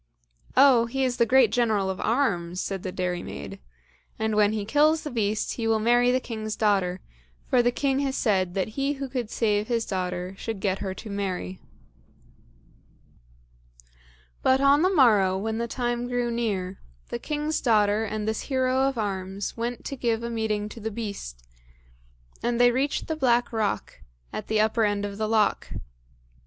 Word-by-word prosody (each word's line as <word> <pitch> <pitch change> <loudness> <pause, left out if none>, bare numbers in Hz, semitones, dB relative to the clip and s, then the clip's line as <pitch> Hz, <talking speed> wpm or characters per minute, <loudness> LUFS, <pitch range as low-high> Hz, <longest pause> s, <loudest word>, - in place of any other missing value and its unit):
"Oh, 255 -4 +6
he 265 +3 -1
is 250 -2 -1
a 235 - +5
great 255 -3 +5
General 220 -5 +1
of 190 - -6
arms," 180 -9 0
said 195 -1 -3
the 185 - -4
dairymaid, 180 - -4 0.6
"and 220 -1 -1
when 210 0 +4
he 215 -2 -2
kills 300 +7 +3
the 300 - -5
beast, 215 -3 -1
he 230 -2 -1
will 225 0 +3
marry 240 +3 +3
the 255 - +2
king's 220 -3 -5
daughter, 190 -4 +1 0.4
for 250 - +3
the 240 - +3
king 270 +1 0
has 275 -1 -1
said 185 -5 +1
that 195 +2 0
he 275 +5 -1
who 275 -1 -5
could 245 -4 -4
save 210 -2 0
his 230 -2 0
daughter 180 -1 -3
should 225 -3 -4
get 190 -1 -1
her 190 -2 -4
to 215 +2 -8
marry." 185 - -3 2.8
But 260 0 +4
on 280 +2 +5
the 370 - +4
morrow, 215 - +4
when 220 +3 -2
the 235 - -1
time 240 0 -2
grew 245 -1 -1
near, 200 -6 -2 0.3
the - - -4
king's 300 +1 -2
daughter 210 -2 +3
and 215 0 -3
this 220 0 -1
hero 260 0 +2
of 270 -2 -2
arms 195 -2 -3
went 235 +1 -4
to 275 - -4
give 235 -3 -1
a 235 - -3
meeting 215 -2 -1
to 230 - -10
the 220 0 -3
beast, 200 - -6 1.0
and 240 0 0
they 245 0 +6
reached 270 +4 -1
the 320 - -1
black 245 -5 +2
rock, 210 - -2 0.3
at - - -5
the 220 0 +1
upper 220 +1 +2
end 205 -1 0
of 200 0 -6
the 215 0 -1
loch. 220 -2 +1
220 Hz, 175 wpm, -26 LUFS, 200-245 Hz, 2.8 s, Oh